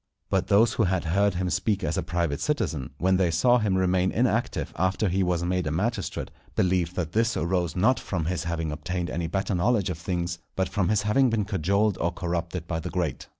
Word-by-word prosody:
But -, -, +1 dB
those 110 Hz, +3 st, +4 dB
who 115 Hz, -, +2 dB
had 95 Hz, -1 st, 0 dB
heard 100 Hz, +4 st, +2 dB
him 90 Hz, 0 st, -1 dB
speak 100 Hz, +1 st, 0 dB
as -, -, -1 dB
a 95 Hz, -, 0 dB
private 85 Hz, -3 st, -1 dB
citizen, 80 Hz, -, -1 dB
when 95 Hz, +3 st, +2 dB
they 90 Hz, -2 st, +2 dB
saw 120 Hz, +10 st, +4 dB
him 100 Hz, -4 st, +1 dB
remain 95 Hz, 0 st, +2 dB
inactive 120 Hz, 0 st, 0 dB
after 95 Hz, +5 st, +1 dB
he 95 Hz, +2 st, +1 dB
was 90 Hz, -2 st, +1 dB
made 90 Hz, -1 st, 0 dB
a -, -, -1 dB
magistrate, 105 Hz, +9 st, -2 dB, 0.2 s
believed 90 Hz, -1 st, +1 dB
that 80 Hz, -4 st, -2 dB
this 115 Hz, +3 st, +1 dB
arose 85 Hz, -1 st, 0 dB
not 110 Hz, +8 st, +3 dB
from 85 Hz, -5 st, -3 dB
his 85 Hz, 0 st, -2 dB
having 80 Hz, -2 st, -2 dB
obtained 90 Hz, +3 st, -3 dB
any 85 Hz, -1 st, -2 dB
better 95 Hz, +3 st, -1 dB
knowledge 100 Hz, +1 st, +1 dB
of 80 Hz, -, -6 dB
things, 85 Hz, -1 st, -2 dB, 0.2 s
but 95 Hz, 0 st, 0 dB
from 95 Hz, -1 st, 0 dB
his 105 Hz, -1 st, +2 dB
having 125 Hz, +5 st, +3 dB
been 110 Hz, -3 st, 0 dB
cajoled 100 Hz, +1 st, +1 dB
or 85 Hz, -, +1 dB
corrupted 85 Hz, -1 st, -3 dB
by 80 Hz, -1 st, -2 dB
the 85 Hz, +2 st, -5 dB
great. 85 Hz, -7 st, -2 dB
90 Hz, 215 wpm, -26 LUFS, 85-100 Hz, 0.2 s, those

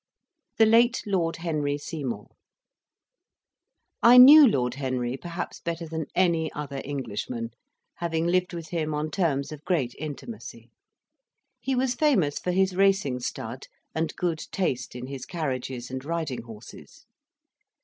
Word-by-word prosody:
THE 225 Hz, -, +6 dB
LATE 235 Hz, +3 st, +4 dB
LORD 180 Hz, -5 st, 0 dB
HENRY 150 Hz, -4 st, -1 dB
SEYMOUR 135 Hz, -8 st, -5 dB, 1.8 s
I 240 Hz, +2 st, +8 dB
knew 285 Hz, +3 st, +11 dB
Lord 125 Hz, -, +1 dB
Henry 130 Hz, -2 st, -2 dB
perhaps 175 Hz, +5 st, -6 dB
better 170 Hz, 0 st, -4 dB
than 160 Hz, -1 st, -4 dB
any 170 Hz, -4 st, +2 dB
other 140 Hz, -2 st, -5 dB
Englishman, 120 Hz, -4 st, -4 dB, 0.5 s
having 165 Hz, -1 st, -1 dB
lived 180 Hz, +1 st, +1 dB
with 165 Hz, -3 st, -7 dB
him 155 Hz, -3 st, -2 dB
on 150 Hz, +1 st, -2 dB
terms 145 Hz, -7 st, 0 dB
of 150 Hz, -1 st, -9 dB
great 145 Hz, -10 st, 0 dB
intimacy. 155 Hz, -, -8 dB, 0.9 s
He 265 Hz, -, -1 dB
was 255 Hz, 0 st, +1 dB
famous 240 Hz, -, +2 dB
for -, -, -4 dB
his 190 Hz, 0 st, +2 dB
racing 195 Hz, -9 st, +2 dB
stud 120 Hz, -, -6 dB, 0.3 s
and 160 Hz, -1 st, -2 dB
good 170 Hz, -3 st, -1 dB
taste 130 Hz, -11 st, -2 dB
in 125 Hz, 0 st, -6 dB
his 135 Hz, -1 st, -7 dB
carriages 130 Hz, -6 st, -4 dB
and 130 Hz, 0 st, -5 dB
riding 160 Hz, -4 st, -3 dB
horses. 115 Hz, -1 st, -13 dB
160 Hz, 135 wpm, -26 LUFS, 135-180 Hz, 1.8 s, knew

